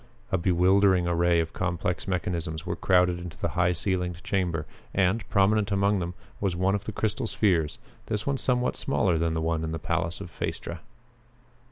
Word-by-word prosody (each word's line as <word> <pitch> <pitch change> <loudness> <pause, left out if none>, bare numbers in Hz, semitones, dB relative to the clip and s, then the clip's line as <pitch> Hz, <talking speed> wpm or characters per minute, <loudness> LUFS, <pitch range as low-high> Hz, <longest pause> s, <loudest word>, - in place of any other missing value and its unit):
A 95 - +3
bewildering 90 +1 +4
array 85 0 +3
of 80 - -5
complex 90 -1 -2
mechanisms 85 -3 -2
was - - -3
crowded 90 -1 +3
into 90 -2 -8
the - - -1
high 90 0 +2
ceilinged 90 -1 -2
chamber 85 -6 -1 0.3
and, 95 +3 +2
prominent 100 0 +3
among 100 0 +2
them, 90 0 -4 0.2
was 95 -3 0
one 95 +2 +2
of 100 0 -2
the - - -3
crystal 110 +2 -1
spheres, 85 -9 +1 0.3
this 105 +1 -2
one 140 -1 0
of - - -10
somewhat 125 -1 +1
smaller 105 -9 +1
size 80 - +1
than 80 0 +1
the 80 - 0
one 80 0 0
in 80 0 -3
the - - -1
palace 80 +1 -2
of - - -8
Phaestra. 85 - -4
90 Hz, 190 wpm, -27 LUFS, 85-100 Hz, 0.3 s, bewildering